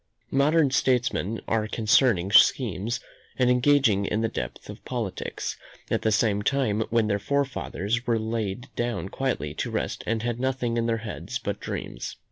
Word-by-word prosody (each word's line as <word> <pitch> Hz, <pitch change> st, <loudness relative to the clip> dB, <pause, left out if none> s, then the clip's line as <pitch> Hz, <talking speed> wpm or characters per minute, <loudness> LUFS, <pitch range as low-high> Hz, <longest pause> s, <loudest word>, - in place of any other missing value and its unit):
Modern 145 Hz, +1 st, +3 dB
statesmen 125 Hz, -5 st, +1 dB
are 110 Hz, -1 st, +1 dB
concerting 110 Hz, -3 st, +3 dB
schemes, 115 Hz, -1 st, +4 dB, 0.4 s
and 125 Hz, -1 st, +4 dB
engaged 135 Hz, +2 st, +4 dB
in 100 Hz, +2 st, 0 dB
the 115 Hz, -, +2 dB
depth -, -, -5 dB
of -, -, -10 dB
politics, 115 Hz, -7 st, -4 dB, 0.3 s
at -, -, +1 dB
the 110 Hz, -, +1 dB, 0.3 s
time 130 Hz, -5 st, +1 dB
when 115 Hz, 0 st, +2 dB
their 100 Hz, -1 st, 0 dB
forefathers 120 Hz, -3 st, -1 dB
were 115 Hz, -1 st, +3 dB
laid 110 Hz, +1 st, -3 dB
down 110 Hz, -7 st, -2 dB
quietly 125 Hz, -, -2 dB
to -, -, -3 dB
rest -, -, -3 dB
and 110 Hz, 0 st, 0 dB
had 120 Hz, 0 st, -2 dB
nothing 125 Hz, -2 st, -1 dB
in 115 Hz, 0 st, +1 dB
their 115 Hz, -1 st, +1 dB
heads 105 Hz, -, -4 dB
but 105 Hz, -5 st, -4 dB
dreams. -, -, -5 dB
115 Hz, 155 wpm, -26 LUFS, 105-125 Hz, 0.4 s, schemes